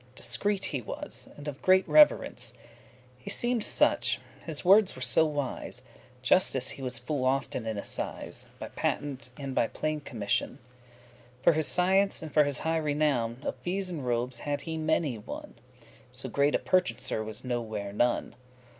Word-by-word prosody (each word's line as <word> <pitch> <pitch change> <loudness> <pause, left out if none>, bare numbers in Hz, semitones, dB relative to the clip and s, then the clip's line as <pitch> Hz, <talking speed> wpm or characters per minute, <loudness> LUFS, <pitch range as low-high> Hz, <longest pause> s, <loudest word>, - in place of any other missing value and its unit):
Discreet 205 +5 -1
he 140 -5 -3
was, 105 - -5
and 145 +1 -10
of 145 -2 -6
great 185 0 +4
reverence: 300 -1 +4 0.6
He - - -9
seemed 240 -2 +4
such, - - +2 0.3
his 160 -1 0
wordes 195 +2 +5
were 130 - -10
so 125 +6 +6
wise, 145 -4 -5 0.4
Justice - - +5
he - - -9
was 130 -1 -3
full 130 +2 -3
often 130 -3 -1
in 110 -1 -3
assize, 100 - -3
By - - -7
patent, 135 -4 -3
and 135 -2 -5
by 115 - +2
plein* 155 +4 -3
commission; 115 -8 -2 0.8
*full 125 - -30
For 170 - +6
his 155 -2 +1
science, 190 +2 +2
and 155 - -8
for 150 -1 +5
his 140 -3 +4
high 165 +1 0
renown, 145 -5 -1
Of - - -3
fees 185 +1 -2
and 155 -6 -5
robes 120 0 -2
had 145 -1 -3
he 160 -1 -5
many 155 -6 -1
one. 105 - -9 0.6
So 130 +1 -2
great 140 +4 +2
a - - +4
purchaser 115 -10 0
was 110 +3 -4
nowhere 110 -5 -4
none. 120 +4 0
145 Hz, 165 wpm, -28 LUFS, 125-160 Hz, 0.8 s, so